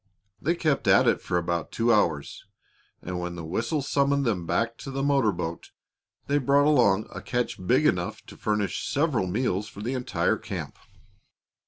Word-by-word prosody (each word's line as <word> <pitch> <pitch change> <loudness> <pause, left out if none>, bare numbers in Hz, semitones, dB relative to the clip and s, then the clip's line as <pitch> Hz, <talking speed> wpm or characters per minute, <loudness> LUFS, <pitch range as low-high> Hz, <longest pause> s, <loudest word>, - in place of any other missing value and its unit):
They 170 +4 +1
kept 155 -5 0
at - - +5
it - - +2
for 90 - -1
about 85 -1 -2
two 115 +1 +2
hours, 80 -9 0 0.6
and 90 0 -4
when 90 0 -4
the 85 -2 -6
whistle 115 - -1
summoned 140 0 +1
them 90 -8 -1
back 115 +4 -1
to - - -7
the 135 0 -3
motor 140 -6 +3
boat 85 -2 -5 0.6
they 145 +1 +1
brought 140 +2 +3
along 115 -9 +4
a - - -6
catch 120 -6 -2
big - - +3
enough - - 0
to - - -12
furnish 105 -2 -1
several 140 - +1
meals 105 0 -1
for 100 - -10
the 125 +4 -2
entire 125 -1 0
camp. - - -7
115 Hz, 175 wpm, -26 LUFS, 90-140 Hz, 0.6 s, at